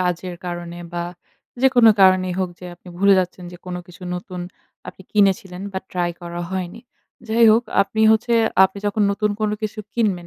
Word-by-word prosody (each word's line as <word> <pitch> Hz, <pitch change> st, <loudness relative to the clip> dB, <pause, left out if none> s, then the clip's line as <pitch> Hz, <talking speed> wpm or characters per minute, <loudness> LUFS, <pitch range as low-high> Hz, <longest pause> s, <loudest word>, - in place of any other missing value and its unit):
কাজের 180 Hz, 0 st, -2 dB
কারণে 175 Hz, 0 st, -6 dB
বা 175 Hz, 0 st, -3 dB, 0.6 s
যেকোনো 245 Hz, -4 st, +6 dB
কারণেই 185 Hz, -1 st, +4 dB
হোক 185 Hz, -1 st, 0 dB
যে, 180 Hz, -, -9 dB
আপনি 180 Hz, -, -17 dB
ভুলে 200 Hz, +1 st, +5 dB
যাচ্ছেন 180 Hz, 0 st, -3 dB
যে, 175 Hz, -, -9 dB
কোন 180 Hz, -1 st, -4 dB
কিছু 180 Hz, +1 st, -15 dB
নতুন 180 Hz, 0 st, -7 dB, 0.5 s
আপনি -, -, -11 dB
কিনেছিলেন 195 Hz, -2 st, +1 dB
বা 190 Hz, -, -2 dB
ট্রাই 175 Hz, -1 st, 0 dB
করা 175 Hz, 0 st, -6 dB
হয়নি। 190 Hz, +3 st, -4 dB, 0.5 s
যাই 230 Hz, +1 st, +4 dB
হোক, 230 Hz, +2 st, +3 dB, 0.2 s
আপনি 210 Hz, +2 st, -4 dB
হচ্ছে 225 Hz, +2 st, 0 dB, 0.3 s
আপনি 190 Hz, +1 st, -2 dB
যখন 205 Hz, +1 st, 0 dB
নতুন 210 Hz, 0 st, 0 dB
কোন 215 Hz, -1 st, +1 dB
কিছু 215 Hz, +1 st, -4 dB, 0.2 s
কিনবেন, 200 Hz, -7 st, 0 dB
185 Hz, 175 wpm, -21 LUFS, 180-210 Hz, 0.6 s, যেকোনো